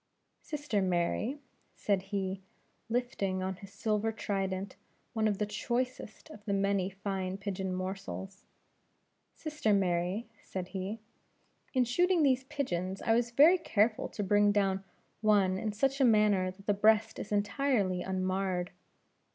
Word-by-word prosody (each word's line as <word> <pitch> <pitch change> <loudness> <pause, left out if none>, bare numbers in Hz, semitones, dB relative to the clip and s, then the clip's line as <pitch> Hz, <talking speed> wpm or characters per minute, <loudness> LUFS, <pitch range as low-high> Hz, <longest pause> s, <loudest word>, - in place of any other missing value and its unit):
"Sister 290 -9 -2
Mary," 185 +8 0 0.4
said 200 -2 +1
he, 195 -1 -3 0.5
lifting 200 -6 -1
on 190 -1 -3
his 195 0 -12
silver 215 +2 0
trident 195 -3 -3 0.4
one 220 -2 +2
of 205 -2 0
the 210 - 0
choicest 240 +4 -3
of 210 - -12
the 200 - 0
many 195 -1 +1
fine 190 -1 -3
pigeon 195 -1 -3
morsels; 190 +1 -5 0.9
"Sister 300 -9 0
Mary," 185 +3 0
said 185 -1 -6
he, 200 +3 -4 0.7
"in 255 - +5
shooting 350 +7 +3
these 265 -2 +3
pigeons, 190 -10 -3
I 225 - +3
was 235 +1 +2
very 305 +9 +6
careful 215 -7 +1
to 210 - -4
bring 205 +1 +4
down 195 -2 +1 0.4
one 200 -3 +3
in 215 - -2
such 270 +6 0
a - - +6
manner 210 -5 +4
that 190 +2 -12
the 205 - +3
breast 215 +2 +3
is 205 - -6
entirely 205 -2 +1
unmarred. 185 -1 -1
200 Hz, 140 wpm, -31 LUFS, 190-225 Hz, 0.9 s, very